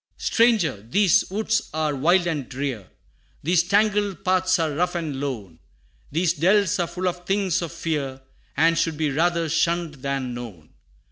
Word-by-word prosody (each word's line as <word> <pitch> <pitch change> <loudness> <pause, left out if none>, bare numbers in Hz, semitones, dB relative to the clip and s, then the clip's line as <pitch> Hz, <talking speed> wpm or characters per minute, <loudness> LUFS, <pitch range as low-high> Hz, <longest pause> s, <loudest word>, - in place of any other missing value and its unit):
III. - - -49
"Stranger! 220 - +2
these 195 +4 +3
woods 215 +3 -1
are 155 -1 0
wild 175 +6 +3
and 150 -7 -3
drear; 130 -7 -4 0.6
These 170 +3 +3
tangled 205 -1 +1
paths 185 0 +2
are 160 -2 0
rough 175 +5 -1
and 155 -6 -3
lone; 110 -12 -5 0.5
These 165 +3 +1
dells 190 +4 +2
are 175 - +1
full 185 +2 -3
of 175 0 -4
things 190 -3 +1
of 170 -2 -4
fear, 150 -6 -3 0.4
And 165 +1 +3
should 160 -2 0
be 155 -2 0
rather 170 +3 +1
shunned 165 -2 0
than 135 -2 -2
known. 105 -11 -9
165 Hz, 160 wpm, -23 LUFS, 140-185 Hz, 0.6 s, these